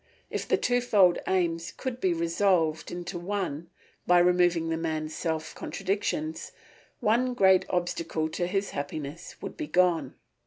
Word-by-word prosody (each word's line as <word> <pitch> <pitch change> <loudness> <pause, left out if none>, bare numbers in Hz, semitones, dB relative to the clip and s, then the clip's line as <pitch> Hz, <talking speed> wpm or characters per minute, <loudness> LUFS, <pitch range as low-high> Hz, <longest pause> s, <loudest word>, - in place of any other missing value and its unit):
If - - -3
the - - +3
twofold 220 -8 +3
aims 170 -3 0
could 255 -2 -4
be 185 - +2
resolved 165 -1 +1
into 175 0 -5
one 175 -4 -3 0.4
by 180 - +6
removing 175 -2 +3
the 165 - 0
man's 155 -1 -3
self 160 -1 -3
contradictions, 185 -5 -3 0.5
one 245 +4 +2
great 190 -4 +5
obstacle 170 -3 -1
to 175 +2 -2
his 195 +2 -1
happiness 145 +2 -6
would - - -6
be - - -5
gone. 175 +1 +2
175 Hz, 140 wpm, -28 LUFS, 160-190 Hz, 0.5 s, by